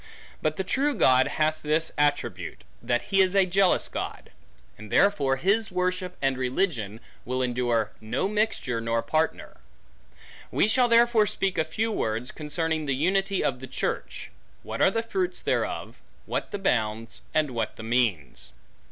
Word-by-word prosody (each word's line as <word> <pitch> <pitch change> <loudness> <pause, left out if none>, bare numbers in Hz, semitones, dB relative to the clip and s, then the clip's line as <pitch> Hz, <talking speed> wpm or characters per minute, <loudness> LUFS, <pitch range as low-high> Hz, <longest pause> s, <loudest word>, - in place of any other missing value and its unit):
But 155 0 0
the 190 - -1
true 280 +8 +1
God 130 - +5
hath 155 0 0
this 155 +2 +1
attribute, 145 0 -1 0.2
that 120 0 0
he 195 - +6
is 190 0 +2
a 195 -1 +5
jealous 185 +1 +3
God; - - -6 0.4
and 110 -1 -12
therefore, 145 -10 +3
his 200 +8 +1
worship 180 0 -1
and 135 -1 +1
religion, 125 - -1 0.2
will 130 +1 -1
endure 120 -3 0
no 115 +11 -1
mixture, 210 - -1
nor 115 0 0
partner. 155 +7 -1 0.9
We - - +2
shall 245 +3 +4
therefore 235 -2 +5
speak 195 -3 -1
a - - +4
few 215 +9 -2
words, 115 - -2
concerning 155 0 -2
the 135 - +1
unity 195 +6 +1
of 125 -2 0
the 130 - -8
church; 130 - -4 0.3
what - - -5
are - - +6
the 225 +3 -1
fruits 360 +10 -2
thereof; - - -2 0.3
what - - -3
the - - -4
bounds; 115 - -1
and 155 -3 +1
what 115 -3 -2
the 110 - -9
means. 110 - -1
155 Hz, 160 wpm, -26 LUFS, 125-195 Hz, 0.9 s, he